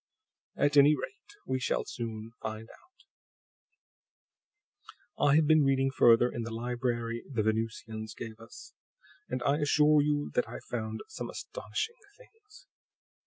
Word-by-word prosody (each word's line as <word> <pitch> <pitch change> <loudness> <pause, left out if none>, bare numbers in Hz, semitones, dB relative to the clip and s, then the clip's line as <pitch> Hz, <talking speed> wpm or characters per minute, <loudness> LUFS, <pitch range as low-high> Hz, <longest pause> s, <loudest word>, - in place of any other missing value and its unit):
"At 145 +1 +2
any 145 +2 +7
rate, 410 - -9
we 130 - -1
shall 125 - -1
soon 115 -2 -6
find 110 0 -5
out. - - -22 2.2
I 140 - +5
have 155 0 +5
been 155 0 +5
reading 135 0 +2
further 120 -2 +5
in 120 - -4
the 115 - -4
library 120 0 -2
the 115 -5 0
Venusians 110 0 -3
gave 115 -1 -8
us, 115 - -13 0.6
and 125 0 -3
I 140 +1 +2
assure 150 0 +4
you 145 0 0
that 125 - 0
I've - - -8
found 110 -2 -3
some 330 - -6
astonishing - - -5 0.2
things." 450 -1 -19
125 Hz, 135 wpm, -30 LUFS, 115-150 Hz, 2.2 s, any